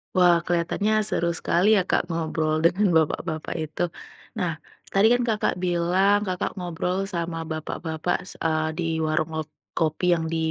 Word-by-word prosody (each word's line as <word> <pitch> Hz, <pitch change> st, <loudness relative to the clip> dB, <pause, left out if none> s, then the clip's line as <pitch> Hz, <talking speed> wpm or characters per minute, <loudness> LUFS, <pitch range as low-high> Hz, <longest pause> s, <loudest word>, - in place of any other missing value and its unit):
Wah, 180 Hz, -2 st, +6 dB
kelihatannya 175 Hz, +5 st, 0 dB, 0.2 s
seru 170 Hz, 0 st, 0 dB
sekali 185 Hz, +6 st, +2 dB
ya -, -, +4 dB
Kak, -, -, +2 dB
ngobrol 160 Hz, -2 st, -1 dB
dengan 185 Hz, +1 st, +3 dB
bapak-bapak 160 Hz, 0 st, -1 dB
itu. 155 Hz, +3 st, -7 dB, 0.6 s
Nah, 180 Hz, -4 st, 0 dB, 0.4 s
tadi 195 Hz, +3 st, +5 dB
kan 245 Hz, -, +2 dB
Kakak 215 Hz, -5 st, 0 dB
bilang, 180 Hz, +3 st, +2 dB
Kakak 185 Hz, -3 st, -2 dB
ngobrol 180 Hz, +2 st, -2 dB
sama 170 Hz, -2 st, -3 dB
bapak-bapak 160 Hz, +2 st, -3 dB
s -, -, -8 dB
eee, 155 Hz, -1 st, 0 dB
di 175 Hz, -, -1 dB, 0.2 s
warung 155 Hz, 0 st, 0 dB
ngo 160 Hz, -, -1 dB, 0.3 s
kopi 160 Hz, +2 st, 0 dB
yang 160 Hz, -1 st, -1 dB
di 165 Hz, -, -1 dB
170 Hz, 155 wpm, -25 LUFS, 160-185 Hz, 0.6 s, Wah